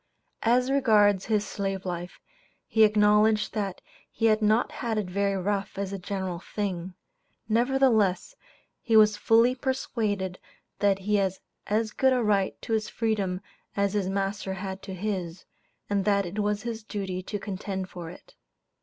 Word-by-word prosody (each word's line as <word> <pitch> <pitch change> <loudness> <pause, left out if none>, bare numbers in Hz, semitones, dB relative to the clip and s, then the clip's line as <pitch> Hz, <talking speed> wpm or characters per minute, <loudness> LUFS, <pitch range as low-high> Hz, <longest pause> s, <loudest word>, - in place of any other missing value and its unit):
As 250 +3 +3
regards 210 -8 +4
his 210 -2 +1
slave 195 -1 -3
life, 175 0 -5 0.5
he 220 - +3
acknowledged 210 0 +4
that 200 -4 -3 0.3
he 225 - -1
had 215 -1 +4
not 215 +3 +2
had 230 -3 -3
it 210 - 0
very 200 +1 0
rough 195 +1 -2
as 200 0 -3
a 195 - -4
general 185 -2 -4
thing; 185 -2 -4 0.5
nevertheless, 240 - +2 0.5
he 225 -3 +3
was 215 -1 +6
fully 230 +3 +4
persuaded 215 -8 -2 0.4
that 200 -1 +3
he 205 +2 0
had 190 -2 +1 0.3
"as 215 +1 0
good 265 +3 +3
a 250 -2 +1
right 200 -3 +1
to 225 - -3
his 220 -1 0
freedom" 200 -5 -1 0.4
as 200 0 +1
his 200 -3 0
"master 195 0 -2
had 190 0 -5
to 190 -2 -7
his," 185 -3 -4 0.4
and 200 -1 0
that 200 0 +2
it 185 +5 -5
was 210 0 0
his 230 -2 -4
duty 195 -4 -4
to 205 +3 -4
contend 195 -1 -4
for 175 -3 -8
it. 345 - -14
205 Hz, 160 wpm, -27 LUFS, 190-220 Hz, 0.5 s, was